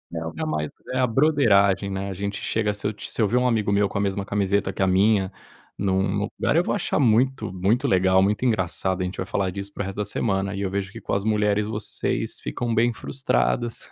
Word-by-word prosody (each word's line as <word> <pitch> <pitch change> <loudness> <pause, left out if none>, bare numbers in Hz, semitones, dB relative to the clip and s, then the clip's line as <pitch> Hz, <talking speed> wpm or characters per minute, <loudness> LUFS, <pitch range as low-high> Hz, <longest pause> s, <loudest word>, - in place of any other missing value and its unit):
é 80 - -3
o 80 - -5
é - - -2
mais 75 -1 -2 0.2
é - - -1
a 130 - +4
"brotheragem", 110 -8 +3
né. 95 +1 -3
A - - -4
gente 100 +2 -4
chega 105 -2 0
se 105 - -1
eu 105 - -2
se 110 - -4
eu 105 - +4
ver 120 +5 +1
um 125 - +2
amigo 110 -4 +1
meu 100 0 +3
com - - -4
a - - +1
mesma 100 0 -1
camiseta 100 -1 0
que - - -5
a 95 - +3
minha, 95 +1 +3 0.5
num 100 +1 0
lugar, - - +1
eu 170 - +4
vou - - -1
achar 205 - -1
muito, 120 -4 +2
muito 100 +7 +1
legal, 95 0 +4
muito 105 +5 0
engraçado, 95 -3 0
a - - 0
gente 90 - -5
vai 95 - -3
falar 95 -2 -1
disso 100 +1 -6
pro - - -3
resto 95 0 -6
da 105 - -1
semana. 100 -2 -1
E 100 - -4
eu 95 -1 -2
vejo 100 -1 -3
que - - -9
com - - -4
as 100 - 0
mulheres, 105 -1 +1
vocês 110 -1 -1
ficam 120 -1 -3
bem 120 +2 +3
frustradas 120 -2 -1
100 Hz, 240 wpm, -24 LUFS, 95-110 Hz, 0.5 s, a